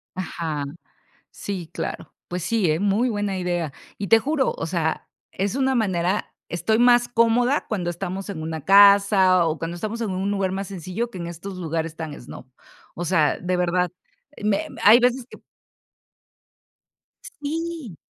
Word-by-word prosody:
Ajá, 160 -5 -3 0.7
sí, 185 -5 -6
claro. - - -5
Pues, 180 -1 -4
sí, 210 -6 +1
¿eh? 155 +4 0
Muy 205 +5 +2
buena 205 -3 -2
idea. 175 -5 -2 0.3
Y 200 - -4
te 225 - +7
juro, 280 +2 0
o - - -3
sea, 165 -2 -2 0.2
es 200 +4 -2
una 265 -1 +1
manera 190 -4 0 0.2
estoy 220 +6 0
más 240 0 +5
cómoda 240 +4 +2
cuando 185 -6 -2
estamos 190 +3 -5
en 160 -5 -5
una 160 -1 -4
casa, 200 -2 +6
o, 155 -1 -1
cuando 165 +1 -4
estamos 215 +6 -4
en 210 - -2
un 190 +2 -2
lugar 195 -2 0
más 195 +1 -4
sencillo 195 +5 -4
que 190 - -11
en 170 - -5
estos 175 +3 -7
lugares 165 -1 -3
tan 160 -2 -5
snob. 120 - -11 0.5
O 175 - -4
sea, 155 -4 +2
de 180 0 -1
verdad, 180 0 +1 0.5
me 210 -1 +1
me - - -11
hay 220 +4 +9
veces 250 0 +2
que - - -11 2.0
Sí. 315 - -4
190 Hz, 160 wpm, -23 LUFS, 170-225 Hz, 2.0 s, hay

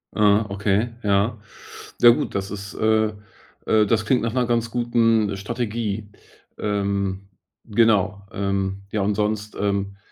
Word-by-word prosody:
Aha, 105 0 +4
okay, 105 +3 0
ja. 105 +3 +1 0.6
Ja, 120 - +9
gut, 120 - +2
das 100 0 -3
ist 100 0 -7
äh, 110 0 +2 0.5
äh, 110 -1 +4
das 110 +1 +1
klingt 125 +3 +2
nach 115 -1 -1
'ner 125 -1 +1
ganz 115 -1 0
guten 115 -4 +2
Strategie. 110 -1 -3 0.5
Ähm, 100 -1 -2 0.4
genau, 100 -3 +2
ähm, 100 0 -2
ja, 105 - -1
und 100 +2 +1
sonst, 105 0 -2
ähm, 100 -1 -1
105 Hz, 135 wpm, -23 LUFS, 100-115 Hz, 0.6 s, Ja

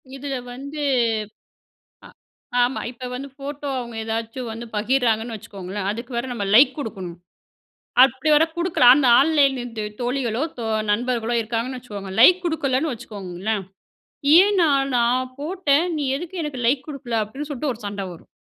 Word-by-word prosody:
இதில 275 0 -4 0.2
வந்து 280 +4 -7 1.3
அ - - -12 0.5
ஆமா. 245 +2 0
இப்ப 250 +1 -8
வந்து 275 +2 -6
ஃபோட்டோ, 285 +1 -6
அவங்க 235 -1 -8
ஏதாச்சும் 225 +2 -4
வந்து 230 +1 -7
பகிர்றாங்கன்னு 230 0 +1
வச்சுக்கோங்களேன், 200 -2 -6
அதுக்கு 235 +4 -6
வேற 235 - -1
நம்ம 220 -4 -3
லைக் 255 +3 +7
குடுக்கணும். 190 - -6 0.9
அப்படி 265 +4 -1
வேற 300 +2 +6
குடுக்கலா, 345 -8 +4
அந்த 275 -3 +3
ஆன்லைன்லந்து 270 -7 +1 0.2
தோழிகளோ 245 -1 -1 0.2
தோ 230 - -3 0.3
நண்பர்களோ 240 +1 -1
இருக்காங்கன்னு 235 +3 -3
வச்சுக்கோங்க, 200 -5 -8
லைக் 360 +9 +7
குடுக்கலன்னு 300 -3 0
வச்சுக்கோங்களேன். 205 -2 -4 0.7
"ஏன் 400 +3 +6
நான் 275 -3 +2
நான் 255 +2 +1
போட்டேன் 320 -1 +1
நீ 290 - -1
எதுக்கு 350 +2 -6
எனக்கு 285 -4 -5
லைக் 260 +2 +1
குடுக்கல?" 245 -6 -2
அப்படின்னு 270 +8 -7
சொல்லிட்டு, 285 0 -2
ஒரு 225 - -15
சண்டை 200 -1 -4
வரும். 170 - -14
250 Hz, 145 wpm, -22 LUFS, 225-280 Hz, 1.3 s, லைக்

